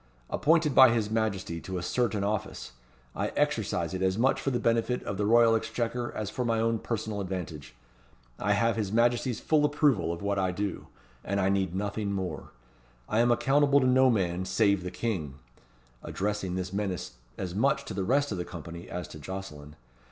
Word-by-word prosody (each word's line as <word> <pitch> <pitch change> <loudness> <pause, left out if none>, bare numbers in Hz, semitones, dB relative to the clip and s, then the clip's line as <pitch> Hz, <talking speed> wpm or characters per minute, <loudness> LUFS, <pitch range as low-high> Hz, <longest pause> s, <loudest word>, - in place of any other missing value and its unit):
Appointed 155 -1 +3
by 130 -1 +9
his 110 -3 0
Majesty 100 -7 -1
to 95 -1 -5
a 85 - -4
certain 110 0 0
office, 100 - -3 0.4
I - - -1
exercise - - 0
it 95 - -3
as 95 +1 +1
much 130 +4 +2
for - - 0
the 125 - 0
benefit 115 +1 +1
of 100 - -4
the 105 0 0
Royal 115 0 +6
Exchequer, 115 +2 -2
as 105 -1 -4
for 125 - -2
my 115 -2 +1
own 115 0 +1
personal 110 -3 -3
advantage. 90 -6 -6 0.6
I 105 0 +2
have 115 +3 +1
his 105 -3 -2
Majesty's 120 +2 +2
full 155 -2 +2
approval 145 - +2
of 85 +2 -6
what 100 -1 0
I 95 -1 +1
do, 100 +1 -4 0.4
and 100 0 -1
I 95 0 +2
need 95 -2 0
nothing 100 +1 -2
more. 95 -2 -4 0.6
I 110 - +1
am 120 +1 +4
accountable 140 +3 +4
to 130 - +1
no 130 +1 +5
man 95 -5 0
save 100 -1 +2
the 90 - -4
King," 90 - -3 0.7
addressing 100 -2 -3
this 95 0 -4
menace 95 -10 -3 0.2
as 90 -3 -4
much 140 +6 +1
to - - -6
the 95 - -2
rest 140 +6 +1
of 95 - -3
the - - -1
company 85 0 -9
as 90 0 -5
to 80 - -10
Jocelyn. 75 -4 -8
105 Hz, 190 wpm, -28 LUFS, 95-120 Hz, 0.7 s, by